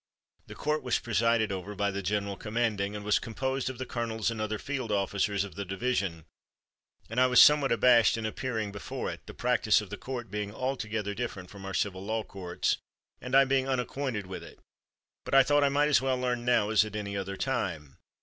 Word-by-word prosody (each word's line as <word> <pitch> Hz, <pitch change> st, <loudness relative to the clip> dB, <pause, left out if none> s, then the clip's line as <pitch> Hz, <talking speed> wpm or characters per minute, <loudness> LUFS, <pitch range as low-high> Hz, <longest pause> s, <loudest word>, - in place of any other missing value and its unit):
The -, -, -9 dB
court 150 Hz, +1 st, -1 dB
was 125 Hz, -2 st, +1 dB
presided 115 Hz, -1 st, +1 dB
over 95 Hz, +2 st, -5 dB
by 100 Hz, +1 st, 0 dB
the 100 Hz, +1 st, -3 dB
general 100 Hz, +1 st, -1 dB
commanding, 105 Hz, -2 st, -1 dB
and 105 Hz, 0 st, -6 dB
was 105 Hz, -, +3 dB
composed 130 Hz, +3 st, -2 dB
of 130 Hz, -, -7 dB
the 130 Hz, -, -4 dB
colonels 115 Hz, -2 st, -2 dB
and 110 Hz, -2 st, -4 dB
other 110 Hz, 0 st, -2 dB
field 130 Hz, -2 st, -4 dB
officers 100 Hz, 0 st, 0 dB
of 100 Hz, -, -8 dB
the 100 Hz, -, -4 dB
division, 95 Hz, -4 st, -2 dB, 0.8 s
and 115 Hz, +3 st, 0 dB
I 130 Hz, -, +6 dB
was 125 Hz, -1 st, +5 dB
somewhat 150 Hz, -2 st, +7 dB
abashed 120 Hz, -1 st, +5 dB
in 115 Hz, -, -3 dB
appearing 110 Hz, -2 st, -3 dB
before 100 Hz, -1 st, -4 dB
it, -, -, -9 dB
the -, -, -9 dB
practice -, -, +3 dB
of -, -, -8 dB
the -, -, -4 dB
court 125 Hz, -3 st, -6 dB
being 105 Hz, -1 st, -3 dB
altogether 110 Hz, -6 st, -2 dB
different 100 Hz, -6 st, -5 dB
from 100 Hz, -1 st, -10 dB
our 95 Hz, -, -4 dB
civil 95 Hz, -2 st, -1 dB
law 110 Hz, +2 st, -2 dB
courts, 90 Hz, -4 st, -2 dB, 0.4 s
and 125 Hz, +1 st, -2 dB
I 135 Hz, 0 st, +7 dB
being 135 Hz, 0 st, +1 dB
unacquainted 130 Hz, -4 st, -2 dB
with 95 Hz, 0 st, -7 dB
it; -, -, -13 dB, 0.7 s
but -, -, -1 dB
I 135 Hz, -, +8 dB
thought 145 Hz, +2 st, +3 dB
I 140 Hz, -, +4 dB
might 145 Hz, +2 st, +2 dB
as 130 Hz, -5 st, +4 dB
well 130 Hz, -1 st, +1 dB
learn 125 Hz, -1 st, -1 dB
now 120 Hz, -4 st, +2 dB
as 110 Hz, -1 st, +5 dB
at 110 Hz, 0 st, -7 dB
any 100 Hz, -1 st, -4 dB
other 95 Hz, 0 st, -4 dB
time. 85 Hz, -, -3 dB
110 Hz, 210 wpm, -29 LUFS, 100-125 Hz, 0.8 s, I